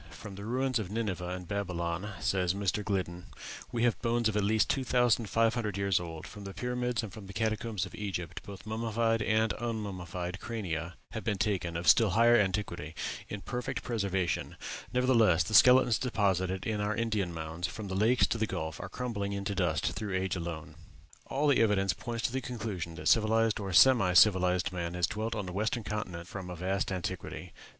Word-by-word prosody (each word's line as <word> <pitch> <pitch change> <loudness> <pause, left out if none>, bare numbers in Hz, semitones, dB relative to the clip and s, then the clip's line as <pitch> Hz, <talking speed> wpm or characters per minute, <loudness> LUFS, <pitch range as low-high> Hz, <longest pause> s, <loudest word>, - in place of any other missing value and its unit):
"From 105 - -9
the 100 +1 -8
ruins 130 +1 0
of 100 -4 -4
Nineveh 100 -5 -2
and 90 -1 -5
Babylon," 90 -1 -2
says 90 -1 +1
Mr. 100 +1 -1
Gliddon, 90 -3 -2 0.5
"we 120 -1 0
have 120 -2 +2
bones 120 -1 +1
of 110 - -1
at 105 - +2
least 110 +2 +3
two 135 - 0
thousand 120 -3 +2
five 115 0 +3
hundred 105 -4 -2
years 100 -2 +2
old; 85 -2 -7
from 105 -2 -10
the 100 -1 -8
pyramids 125 -1 -1
and 110 - -6
the 100 -1 -10
catacombs 110 -2 -1
of 95 - -11
Egypt 95 -5 -4
both 100 -1 -10
mummied 115 0 0
and 110 +1 +2
unmummied 95 -6 -4
crania 90 -7 -4 0.2
have 110 -2 -5
been 105 -3 0
taken, 95 -5 -1
of 85 0 -4
still 105 +8 +6
higher 115 +5 +5
antiquity, 95 -6 0 0.3
in 105 - -5
perfect 125 +4 -4
preservation; 100 -6 -1 0.4
nevertheless, 115 -10 +4
the 110 - -6
skeletons 125 0 +7
deposited 95 -6 0
in 105 -1 -1
our 105 +1 0
Indian 110 -5 -1
mounds, 80 +2 -4
from 105 +4 -7
the 95 - -4
Lakes 115 +6 +4
to 115 - -2
the 110 - +1
Gulf, 80 -4 -4
are 90 - -6
crumbling 100 -3 -3
into 100 +1 -2
dust 85 -6 0
through 105 -3 -4
age 95 0 0
alone." 85 -2 -5 0.5
All 140 +3 0
the 145 -4 +4
evidence 100 -4 +3
points 115 +5 -5
to - - +1
the 130 +1 -2
conclusion 105 -9 -5
that - - -5
civilized 110 0 +3
or 100 -2 -4
semi 100 -1 +6
civilized 90 -1 +5
man 85 -1 -3
has 90 -1 +2
dwelt 110 +5 -3
on 105 -2 -3
the 90 - -6
western 110 +4 -1
continent 90 -5 -4
from 95 -2 -7
a 90 - -5
vast 95 +3 -1
antiquity. 95 0 -5
100 Hz, 190 wpm, -30 LUFS, 90-115 Hz, 0.5 s, skeletons